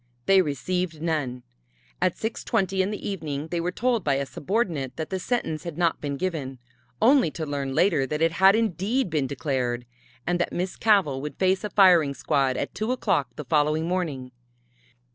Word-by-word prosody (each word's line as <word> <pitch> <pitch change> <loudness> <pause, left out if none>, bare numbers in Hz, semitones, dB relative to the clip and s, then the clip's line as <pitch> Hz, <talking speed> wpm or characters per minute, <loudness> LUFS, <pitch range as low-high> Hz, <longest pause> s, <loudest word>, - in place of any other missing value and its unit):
They 195 +3 +6
received 165 +3 -2
none. 145 -7 -2 0.6
At - - +2
6:20 210 -3 -1
in 190 - 0
the 210 - -5
evening 155 -6 -4
they 170 0 -1
were 175 +2 -1
told 235 0 0
by 140 -3 +2
a 140 0 -1
subordinate 165 - -2
that 160 +2 -5
the 190 - -1
sentence 180 -8 -2
had 170 -3 -6
not 170 -2 +1
been 140 -1 -3
given 145 -7 -3 0.4
only 260 - +5
to 160 +1 -5
learn 140 -2 -3
later 160 -8 +3
that 150 +3 -2
it 165 +1 +3
had 190 +4 +5
indeed 220 +1 0
been 150 -4 0
declared, 125 -4 -2 0.4
and 175 0 0
that 175 - 0
Miss 180 +2 -3
Cavell 190 -12 +2
would 150 -1 -6
face 190 +1 +2
a 210 - -2
firing 175 -9 +5
squad 135 -4 +1
at - - -3
two 215 +4 -2
o'clock 190 - 0
the 150 - -7
following 150 +3 +1
morning. 155 -8 -2
165 Hz, 180 wpm, -25 LUFS, 145-190 Hz, 0.6 s, They